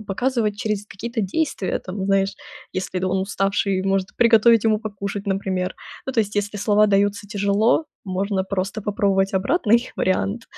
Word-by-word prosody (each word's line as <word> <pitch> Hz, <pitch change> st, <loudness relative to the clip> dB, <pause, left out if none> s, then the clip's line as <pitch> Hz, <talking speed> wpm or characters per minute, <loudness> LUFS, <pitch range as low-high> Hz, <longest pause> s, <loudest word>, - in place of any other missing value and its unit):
показывать 215 Hz, 0 st, -1 dB
через 210 Hz, -3 st, -2 dB
какие-то 230 Hz, +4 st, -4 dB
действия. 215 Hz, -, -1 dB
Там, 190 Hz, +1 st, -5 dB
знаешь, 195 Hz, 0 st, +1 dB, 0.4 s
если 185 Hz, -1 st, -3 dB
он 190 Hz, 0 st, +1 dB
уставший, 195 Hz, 0 st, 0 dB
может 195 Hz, 0 st, -1 dB
приготовить 230 Hz, -1 st, +5 dB
ему 220 Hz, -1 st, +3 dB
покушать, 200 Hz, -1 st, -5 dB
например. 190 Hz, -2 st, -1 dB, 0.3 s
Ну, 265 Hz, -, -2 dB
то 230 Hz, -, +3 dB
есть, 205 Hz, -1 st, -3 dB
если 205 Hz, 0 st, -1 dB
слова 210 Hz, +1 st, +3 dB
даются 200 Hz, 0 st, +1 dB
тяжело, 205 Hz, +7 st, +2 dB, 0.2 s
можно 190 Hz, +1 st, -1 dB
просто 195 Hz, +2 st, -3 dB
попробовать 195 Hz, -1 st, +1 dB
обратный 235 Hz, -, +2 dB
вариант. 200 Hz, +4 st, 0 dB
200 Hz, 150 wpm, -22 LUFS, 195-215 Hz, 0.4 s, приготовить